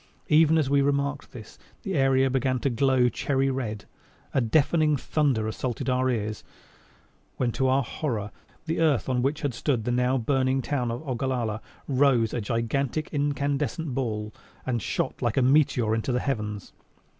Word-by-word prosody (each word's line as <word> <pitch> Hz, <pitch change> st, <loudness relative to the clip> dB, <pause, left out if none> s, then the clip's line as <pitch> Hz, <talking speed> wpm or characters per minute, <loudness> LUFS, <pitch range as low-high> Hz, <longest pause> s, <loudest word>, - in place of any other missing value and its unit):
Even 160 Hz, +1 st, +5 dB
as 155 Hz, -4 st, +2 dB
we 140 Hz, +1 st, +3 dB
remarked 140 Hz, 0 st, -1 dB
this, 110 Hz, -3 st, -12 dB, 0.2 s
the 195 Hz, -, -3 dB
area 135 Hz, -3 st, +3 dB
began 130 Hz, 0 st, 0 dB
to 135 Hz, +2 st, -1 dB
glow 130 Hz, +1 st, +3 dB
cherry 135 Hz, +3 st, 0 dB
red. 110 Hz, -6 st, -4 dB, 0.5 s
A 135 Hz, -, +2 dB
deafening 150 Hz, +5 st, +2 dB
thunder 135 Hz, -7 st, 0 dB
assaulted 120 Hz, +3 st, -3 dB
our 130 Hz, +1 st, +1 dB
ears 110 Hz, -3 st, -2 dB, 0.9 s
when 125 Hz, -2 st, 0 dB
to 130 Hz, +3 st, 0 dB
our 135 Hz, +1 st, +3 dB
horror 110 Hz, -5 st, -3 dB, 0.3 s
the 165 Hz, +1 st, -2 dB
earth 150 Hz, -9 st, +2 dB
on 125 Hz, -2 st, +1 dB
which 140 Hz, +4 st, -1 dB
had 140 Hz, -3 st, 0 dB
stood 125 Hz, -1 st, -1 dB
the 120 Hz, -, -1 dB
now 125 Hz, +2 st, +2 dB
burning 130 Hz, +1 st, +1 dB
town 130 Hz, -5 st, -1 dB
of 120 Hz, +6 st, -5 dB
Ogallala, 120 Hz, -4 st, -2 dB, 0.3 s
rose 130 Hz, -5 st, +3 dB
a 120 Hz, -, -1 dB
gigantic 120 Hz, +7 st, -2 dB
incandescent 145 Hz, 0 st, -1 dB
ball 110 Hz, -5 st, -3 dB, 0.3 s
and 120 Hz, -3 st, -1 dB
shot -, -, -2 dB
like 120 Hz, 0 st, 0 dB
a 135 Hz, -, +4 dB
meteor 130 Hz, -5 st, +3 dB
into 115 Hz, +3 st, -1 dB
the 125 Hz, -, +1 dB
heavens. 105 Hz, -7 st, -3 dB
130 Hz, 165 wpm, -26 LUFS, 115-140 Hz, 0.9 s, Even